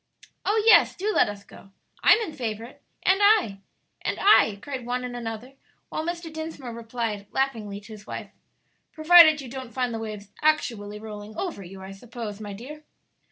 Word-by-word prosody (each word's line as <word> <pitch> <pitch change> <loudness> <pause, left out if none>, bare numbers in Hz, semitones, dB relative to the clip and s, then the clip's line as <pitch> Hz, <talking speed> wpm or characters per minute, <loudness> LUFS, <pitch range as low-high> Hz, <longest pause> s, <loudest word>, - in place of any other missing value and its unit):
"Oh, 430 +1 +2
yes, 455 - +6
do 420 +3 -1
let - - +4
us 200 -1 -8
go!" 195 - -16 0.3
"I'm - - +7
in 315 - -8
favor 225 -5 -4
of 240 - -9
it!" - - -25 0.2
"And 380 +1 +4
I!" 405 - +4 0.4
"And - - -2
I!" 225 - +5
cried 265 +1 -6
one 250 +1 -2
and 250 -1 -5
another, 235 +2 -6 0.4
while 310 - -3
Mr. 340 -1 -5
Dinsmore 315 -6 -6
replied, 225 -3 -4
laughingly, 225 -7 -2
to 220 +2 -12
his 210 -1 -13
wife, - - -7 0.6
"Provided 315 -1 +7
you 265 - -8
don't 255 -2 -8
find 250 -2 -1
the 225 - -3
waves 210 -2 -7
actually 230 -9 0
rolling 210 0 -9
over 345 - -4
you, 190 +1 -10
I 190 - -8
suppose, 220 0 -8
my 205 -1 -6
dear. 285 +9 -10
240 Hz, 185 wpm, -25 LUFS, 210-310 Hz, 0.6 s, I'm